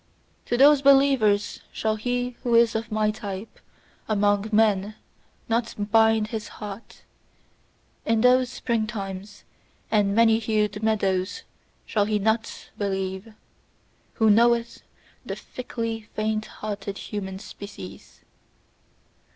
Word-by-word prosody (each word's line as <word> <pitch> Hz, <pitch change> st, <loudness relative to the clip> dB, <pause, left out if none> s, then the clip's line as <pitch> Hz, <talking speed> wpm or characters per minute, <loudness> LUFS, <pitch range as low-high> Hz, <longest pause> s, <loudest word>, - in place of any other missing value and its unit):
To 240 Hz, -, 0 dB
those 285 Hz, +1 st, +6 dB
believers 270 Hz, -7 st, +3 dB
shall 220 Hz, 0 st, -1 dB
he 245 Hz, +3 st, -2 dB
who 240 Hz, -2 st, +1 dB
is 230 Hz, 0 st, +5 dB
of 225 Hz, +1 st, -3 dB
my 215 Hz, 0 st, +1 dB
type 210 Hz, -1 st, -7 dB, 0.5 s
among 205 Hz, 0 st, +2 dB
men 210 Hz, -1 st, +2 dB, 0.5 s
not 230 Hz, +1 st, -1 dB, 0.2 s
bind 220 Hz, -1 st, +4 dB
his 220 Hz, -1 st, -4 dB
heart; 210 Hz, +1 st, -9 dB, 1.0 s
in 225 Hz, -1 st, +1 dB
those 250 Hz, +1 st, +4 dB
spring 230 Hz, -3 st, -1 dB
times 195 Hz, -1 st, -7 dB, 0.5 s
and 205 Hz, -2 st, +2 dB
many 225 Hz, 0 st, +5 dB
hued 210 Hz, -2 st, -1 dB
meadows 195 Hz, -4 st, 0 dB, 0.4 s
shall 205 Hz, -2 st, +1 dB
he 215 Hz, 0 st, 0 dB
not 220 Hz, +2 st, -2 dB
believe, 190 Hz, +1 st, -3 dB, 0.8 s
who 220 Hz, -3 st, +4 dB
knoweth 235 Hz, +2 st, +3 dB, 0.4 s
the -, -, -5 dB
fickly 230 Hz, -3 st, -5 dB
faint 215 Hz, 0 st, -1 dB
hearted 205 Hz, -1 st, -6 dB
human 190 Hz, -3 st, -5 dB
species! 200 Hz, 0 st, -11 dB
215 Hz, 110 wpm, -25 LUFS, 205-230 Hz, 1.0 s, those